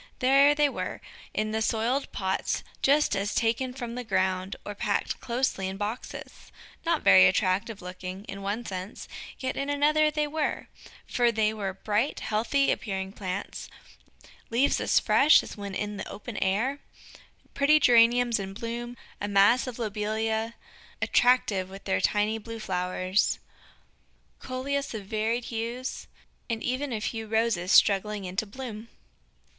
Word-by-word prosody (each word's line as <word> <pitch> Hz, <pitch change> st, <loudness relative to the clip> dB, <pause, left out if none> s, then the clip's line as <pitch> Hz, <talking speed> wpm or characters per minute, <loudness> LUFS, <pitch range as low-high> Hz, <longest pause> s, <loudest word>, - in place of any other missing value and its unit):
There 275 Hz, +3 st, +5 dB
they 295 Hz, 0 st, +4 dB
were, 280 Hz, -, -4 dB, 0.3 s
in 215 Hz, 0 st, -1 dB
the 220 Hz, 0 st, -1 dB
soiled 235 Hz, +5 st, 0 dB
pots 190 Hz, -1 st, -1 dB, 0.2 s
just 285 Hz, -5 st, +3 dB
as 200 Hz, +1 st, -2 dB
taken 235 Hz, +3 st, +1 dB
from 245 Hz, -2 st, -6 dB
the 250 Hz, +1 st, -4 dB
ground, 190 Hz, -2 st, 0 dB
or 205 Hz, -, -4 dB
packed 200 Hz, 0 st, -1 dB
closely 235 Hz, -6 st, -1 dB
in 190 Hz, +1 st, -5 dB
boxes. 210 Hz, +4 st, -6 dB, 0.3 s
Not 335 Hz, -2 st, 0 dB
very 185 Hz, -, +8 dB
attractive 195 Hz, +2 st, 0 dB
looking, 185 Hz, +1 st, -7 dB
in 195 Hz, -2 st, -7 dB
one 205 Hz, +4 st, -3 dB
sense, 190 Hz, +1 st, -6 dB, 0.3 s
yet 260 Hz, -1 st, -3 dB
in 275 Hz, +1 st, -2 dB
another 305 Hz, +2 st, +3 dB
they 300 Hz, 0 st, 0 dB
were, 300 Hz, 0 st, -2 dB, 0.4 s
for 240 Hz, -1 st, +2 dB
they 220 Hz, -1 st, +1 dB
were 195 Hz, -3 st, -4 dB
bright, 215 Hz, +7 st, -1 dB
healthy 235 Hz, +6 st, +1 dB
appearing 190 Hz, -3 st, -3 dB
plants 195 Hz, -1 st, -5 dB, 0.8 s
leaves 250 Hz, +5 st, +2 dB
as -, -, +3 dB
fresh 295 Hz, +3 st, +5 dB
as -, -, -9 dB
when 200 Hz, -2 st, -6 dB
in 210 Hz, 0 st, -3 dB
the -, -, -6 dB
open 215 Hz, +2 st, -8 dB
air, 225 Hz, +9 st, 0 dB, 0.7 s
pretty 300 Hz, +2 st, +4 dB
Geraniums 240 Hz, -2 st, +5 dB
in 195 Hz, 0 st, -6 dB
bloom, 235 Hz, +2 st, -5 dB, 0.2 s
a 205 Hz, -, -1 dB
mass 205 Hz, +6 st, +4 dB
of 250 Hz, -, -6 dB
Lobelia, 220 Hz, +1 st, -2 dB, 0.4 s
attractive 220 Hz, -7 st, +2 dB
with 195 Hz, +1 st, -10 dB
their 190 Hz, -, 0 dB
tiny 210 Hz, +1 st, +1 dB
blue 230 Hz, +1 st, -8 dB
flowers, 185 Hz, -1 st, 0 dB, 1.0 s
Coleus 270 Hz, 0 st, -3 dB
of 205 Hz, -3 st, -6 dB
varied 220 Hz, +4 st, -1 dB
hues, 235 Hz, +3 st, -4 dB, 0.4 s
and 225 Hz, -1 st, -2 dB
even 260 Hz, +2 st, -2 dB
a 220 Hz, -, -2 dB
few 225 Hz, 0 st, -3 dB
Roses 220 Hz, -5 st, +1 dB
struggling 205 Hz, 0 st, +4 dB
into 190 Hz, +4 st, -3 dB
bloom. 225 Hz, -1 st, -7 dB
220 Hz, 145 wpm, -27 LUFS, 200-250 Hz, 1.0 s, very